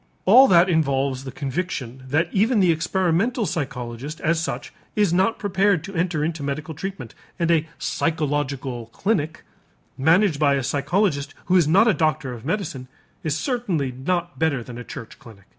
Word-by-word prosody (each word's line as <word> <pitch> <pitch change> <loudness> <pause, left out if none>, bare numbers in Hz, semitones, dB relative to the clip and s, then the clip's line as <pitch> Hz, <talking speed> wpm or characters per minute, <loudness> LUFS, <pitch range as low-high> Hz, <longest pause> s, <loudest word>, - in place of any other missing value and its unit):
All 250 +8 +8
that 175 0 +6
involves 140 -5 0
the 130 - -5
conviction 135 -3 -4
that 155 +5 +1
even 220 +3 +2
the 180 -3 +5
experimental 190 +8 +1
psychologist 135 -3 -4
as 165 +1 +1
such 165 - -4 0.2
is 205 -5 +2
not 190 +5 +2
prepared 195 -4 +1
to 195 +2 -8
enter 165 -3 0
into 160 -1 -3
medical 145 +3 -4
treatment; 185 - -6 0.2
and 170 -1 +1
a 160 -1 +2
"Psychological 140 -6 -2
Clinic," 170 -6 -1 0.6
managed 165 +2 +3
by 140 -2 +4
a 135 - -1
psychologist 145 +2 0
who 185 - +2
is 175 -5 +5
not 195 +9 +5
a 220 - +5
doctor 155 -6 0
of 115 -2 -9
medicine, 160 -6 -3 0.4
is 155 -1 -1
certainly 190 - -1
not 175 +7 -3
better 150 -6 +1
than 120 0 -9
a - - -6
church 115 - -9
clinic. 110 -7 -15
160 Hz, 165 wpm, -23 LUFS, 140-185 Hz, 0.6 s, All